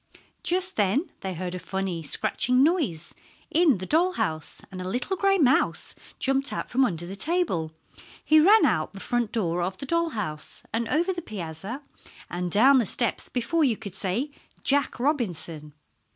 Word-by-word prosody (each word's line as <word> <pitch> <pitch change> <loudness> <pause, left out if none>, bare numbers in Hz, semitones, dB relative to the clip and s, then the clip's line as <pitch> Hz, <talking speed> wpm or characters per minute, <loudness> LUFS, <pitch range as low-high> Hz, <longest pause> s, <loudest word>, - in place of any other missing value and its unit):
Just 370 +1 -1
then 230 - +1
they 190 -2 -4
heard 180 +1 -4
a 180 - -4
funny, 190 -2 -3
scratching 250 - +3
noise 275 - 0 0.4
in 320 - +4
the 185 - -6
doll 345 - +2
house, 155 - -3
and 185 -1 -6
a 185 - -4
little 250 - -2
gray 390 +1 +3
mouse 270 -6 +2 0.2
jumped 270 +1 0
out - - -4
from 265 +2 +3
under 175 -6 -2
the 190 +3 -7
table. 200 - -1 0.5
He 310 0 +6
ran 395 +3 +6
out 180 - 0
the 195 - -9
front 240 0 -1
door 175 -6 0
of 185 +2 -2
the 275 - -6
doll 335 +3 +1
house, 155 -7 -6
and 230 0 -1
over 345 +5 +1
the 350 - -5
piazza, 195 - -6 0.5
and 180 0 -2
down 260 +7 +6
the 235 - +1
steps 240 -2 -2
before 255 +7 0
you 240 -7 +2
could 200 -4 -8
say 210 +9 -2 0.3
"Jack 280 -2 +1
Robinson." 175 - -1
235 Hz, 175 wpm, -26 LUFS, 180-300 Hz, 0.5 s, He